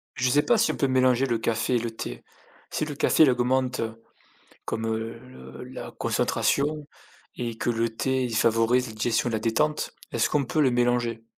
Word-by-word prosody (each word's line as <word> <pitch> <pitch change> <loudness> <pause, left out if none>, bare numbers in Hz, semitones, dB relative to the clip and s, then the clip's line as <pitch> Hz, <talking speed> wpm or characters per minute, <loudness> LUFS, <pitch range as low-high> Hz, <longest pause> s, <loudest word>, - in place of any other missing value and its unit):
Je 125 0 +1
sais 145 +3 +4
pas 240 -2 +3
si 225 - +3
on - - -6
peut 140 - +1
mélanger 130 0 +3
le 120 -2 0
café 115 +2 0
et - - +3
le 115 0 -3
thé. 85 - -7 0.5
Si - - -1
le 150 - -6
café, 160 - +3
il 145 - +7
augmente, 130 +1 0 0.9
comme, 115 0 -3
heu, 110 +1 -3
le 65 - -12
la - - -8
concentration 150 +1 0 0.5
et 115 -2 -4
que - - -1
le 115 0 +1
thé, 130 +3 -1
il 115 -2 -2
favorise 115 +3 +3
la 110 - -8
digestion 115 +2 0
et - - -4
la 110 - 0
détente, 150 +8 0 0.2
est-ce - - +1
qu'on 140 -3 +1
peut 155 - -1
les 130 -4 +4
mélanger? 120 -2 0
120 Hz, 200 wpm, -26 LUFS, 115-130 Hz, 0.9 s, il